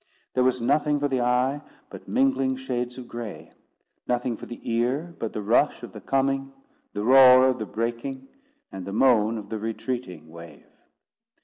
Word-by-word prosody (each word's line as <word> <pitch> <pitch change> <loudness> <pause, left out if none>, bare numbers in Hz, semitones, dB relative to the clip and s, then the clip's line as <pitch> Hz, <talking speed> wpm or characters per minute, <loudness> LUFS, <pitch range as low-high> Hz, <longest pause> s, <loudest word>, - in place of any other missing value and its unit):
There 130 - +2
was 130 0 +2
nothing 145 +4 +1
for 145 - +1
the 130 -3 -1
eye 125 +4 +1 0.3
but - - -11
mingling 245 - +1
shades 125 -1 -4
of 125 -2 -9
gray; 120 -4 -8 0.6
nothing 125 -1 -1
for - - -10
the 120 - -8
ear 130 +9 -1
but 115 - -3
the 105 - -5
rush 120 +8 +2
of - - -8
the - - -9
coming, 135 0 0 0.4
the 105 - -3
roar 130 +1 +7
of 130 -1 0
the 110 - -4
breaking, 120 +4 -4 0.4
and 95 -1 -7
the 100 - -5
moan 115 -2 +3
of 105 -2 -8
the 110 - -4
retreating 115 - -5
wave. 85 -3 -13
125 Hz, 175 wpm, -25 LUFS, 115-135 Hz, 0.6 s, roar